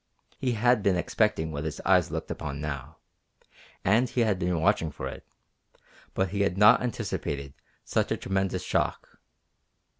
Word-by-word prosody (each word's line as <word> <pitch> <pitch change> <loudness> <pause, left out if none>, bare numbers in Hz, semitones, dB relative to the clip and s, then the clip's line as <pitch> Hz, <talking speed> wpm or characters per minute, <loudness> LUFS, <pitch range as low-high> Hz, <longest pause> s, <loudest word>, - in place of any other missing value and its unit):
He 125 -2 0
had 120 +1 +3
been 100 -2 +2
expecting 90 -3 0
what 70 -1 -4
his 80 -1 -4
eyes 90 -2 +3
looked - - -4
upon 70 -1 -5
now, 75 0 -5 0.9
and 115 +6 +3
he 125 - 0
had 105 -5 +1
been 90 -2 0
watching 80 0 +2
for 75 - -6
it, - - -8 0.9
but 95 -1 +1
he 100 +2 -2
had 100 -2 +1
not 105 +1 +7
anticipated 75 - -3 0.3
such - - 0
a - - +1
tremendous 95 -1 -1
shock. - - -2
95 Hz, 155 wpm, -27 LUFS, 80-105 Hz, 0.9 s, not